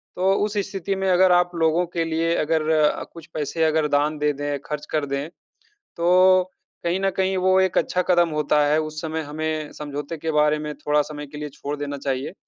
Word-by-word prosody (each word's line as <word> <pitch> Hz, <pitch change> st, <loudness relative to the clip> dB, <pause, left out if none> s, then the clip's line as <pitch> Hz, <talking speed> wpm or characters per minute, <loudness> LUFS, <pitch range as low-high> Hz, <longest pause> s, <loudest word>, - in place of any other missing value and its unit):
तो 190 Hz, +2 st, +2 dB
उस 210 Hz, 0 st, -4 dB
स्थिति 195 Hz, 0 st, -3 dB
में 190 Hz, 0 st, -1 dB
अगर 185 Hz, +1 st, +5 dB
आप 175 Hz, 0 st, +3 dB
लोगों 165 Hz, +2 st, +2 dB
के 170 Hz, -, 0 dB
लिए 165 Hz, +1 st, 0 dB
अगर 160 Hz, +1 st, +1 dB, 0.5 s
कुछ 165 Hz, -2 st, -11 dB
पैसे 155 Hz, +2 st, -2 dB
अगर 155 Hz, -1 st, +2 dB
दान 145 Hz, +2 st, +1 dB
दे 150 Hz, 0 st, +2 dB
दें, 145 Hz, 0 st, -3 dB
ख़र्च 150 Hz, 0 st, -5 dB
कर 150 Hz, -2 st, 0 dB
दें, 140 Hz, +3 st, -3 dB, 0.7 s
तो 185 Hz, +2 st, +4 dB, 0.3 s
कहीं 170 Hz, +2 st, +1 dB
न 195 Hz, -, +1 dB
कहीं 190 Hz, 0 st, +1 dB
वो 185 Hz, +1 st, +3 dB
एक 190 Hz, -1 st, +2 dB
अच्छा 180 Hz, -, 0 dB
कदम 175 Hz, -2 st, +4 dB
होता 150 Hz, -1 st, +1 dB
है। 150 Hz, +1 st, +3 dB
उस 155 Hz, 0 st, -5 dB
समय 160 Hz, 0 st, -3 dB
हमें 155 Hz, 0 st, -4 dB
समझौते 145 Hz, +2 st, -5 dB
के 160 Hz, +1 st, -3 dB
बारे 150 Hz, 0 st, +3 dB
में 150 Hz, 0 st, -5 dB
थोड़ा 150 Hz, 0 st, +1 dB
समय 150 Hz, 0 st, -8 dB
के 150 Hz, +1 st, -10 dB
लिए 150 Hz, 0 st, -5 dB
छोड़ 145 Hz, +1 st, -5 dB
देना 145 Hz, 0 st, -4 dB
चाहिए। 135 Hz, 0 st, -3 dB
155 Hz, 205 wpm, -23 LUFS, 150-175 Hz, 0.7 s, अगर